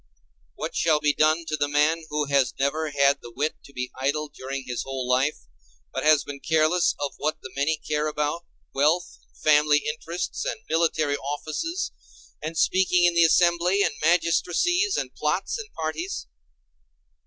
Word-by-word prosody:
What - - -5
shall 155 -2 +3
be 150 -1 +2
done 155 +3 +2
to 155 - -2
the 145 -1 0
man 150 +3 +1
who 150 0 -1
has 140 -2 +1
never 155 +3 0
had 140 -1 +3
the 120 - -10
wit 145 +6 -2
to - - -14
be 125 -1 -5
idle 145 +3 -1
during 135 -1 -6
his 125 -1 -3
whole 135 -2 -4
life; 130 +4 +1 0.5
but - - -2
has 155 -1 +5
been 140 -1 -8
careless 160 +3 +2
of 145 -1 -3
what 155 +1 -1
the 130 - -8
many 145 +3 +1
care 150 0 -2
about—wealth 155 +2 -1
and - - -30
family 150 -1 +4
interests, 165 +3 -4
and - - -4
military 155 -3 +1
offices, 155 - -3 0.5
and 160 +2 -5
speaking 180 0 +3
in 175 - +4
the 170 0 +5
assembly, 175 +3 +3
and - - 0
magistracies, 180 - +2
and - - -3
plots, - - -1
and 430 -1 -8
parties. 160 - -4
155 Hz, 165 wpm, -25 LUFS, 145-170 Hz, 0.5 s, has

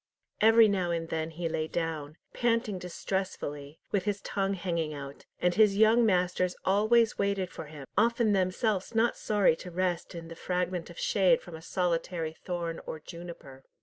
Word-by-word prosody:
Every 225 +1 +7
now 190 -4 0
and 165 -1 -2
then 160 0 -2
he 165 +1 -4
lay 155 -1 -2
down, 160 -2 -3 0.2
panting 230 -5 0
distressfully, 170 -5 -4
with 200 -2 0
his 205 -1 -1
tongue 195 0 -1
hanging 170 -5 -2
out, 140 0 -9
and 180 0 +2
his 205 0 +4
young 225 +2 +5
masters 180 -1 +1
always 215 +4 +3
waited 200 -2 0
for 160 - -7
him, 150 -2 -10
often 230 0 +3
themselves 195 +3 0
not 230 +1 +3
sorry 205 -6 +2
to 180 - -8
rest 180 -1 -2
in 165 -1 -7
the 165 - -9
fragment 180 0 -2
of 170 - -12
shade 185 -5 +3
from 175 -3 -10
a 160 - -9
solitary 170 -2 -1
thorn 170 -2 -3
or 160 - -5
juniper. 165 -5 -10
180 Hz, 170 wpm, -29 LUFS, 165-200 Hz, 0.2 s, Every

